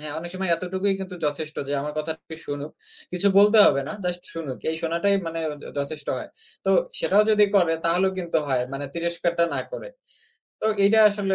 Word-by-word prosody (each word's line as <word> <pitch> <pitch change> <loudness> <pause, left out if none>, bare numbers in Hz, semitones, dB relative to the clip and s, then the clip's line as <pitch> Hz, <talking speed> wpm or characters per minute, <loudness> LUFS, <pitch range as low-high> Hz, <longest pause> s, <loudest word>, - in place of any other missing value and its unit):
হ্যাঁ, 150 -1 -6
অনেক 175 +1 -7
সময় 185 -1 -2
এতটুকুই 190 +3 -1
কিন্তু 185 -1 -6
যথেষ্ট 155 +1 -3
যে - - -2
আমার 150 +1 -4
কথাটি 160 +1 -5
শুনুক। 145 +1 -5 0.4
কিছু 180 +3 0
বলতে 210 +2 +6
হবে 140 - +3
না, - - -4
জাস্ট 180 0 -2
শুনুক। 150 -6 -5
এই 160 - -1
শোনাটাই 170 +5 +1
মানে 165 0 -3
য - - -6 0.2
যথেষ্ট 140 +1 -4
হয়। - - -7 0.4
তো - - +3 0.3
সেটাও 205 +2 +4
যদি 210 -1 +5
করে 175 -4 +3
তাহলেও 185 +3 +2
কিন্তু 170 -2 0
হয়, 130 -2 +2
মানে 140 +1 -4
তিরস্কারটা 170 0 0
না - - +1
করে। - - -7 0.7
তো - - +1 0.2
এইটা 220 +2 +5
আসলে 200 -2 -1
170 Hz, 190 wpm, -24 LUFS, 155-190 Hz, 0.7 s, বলতে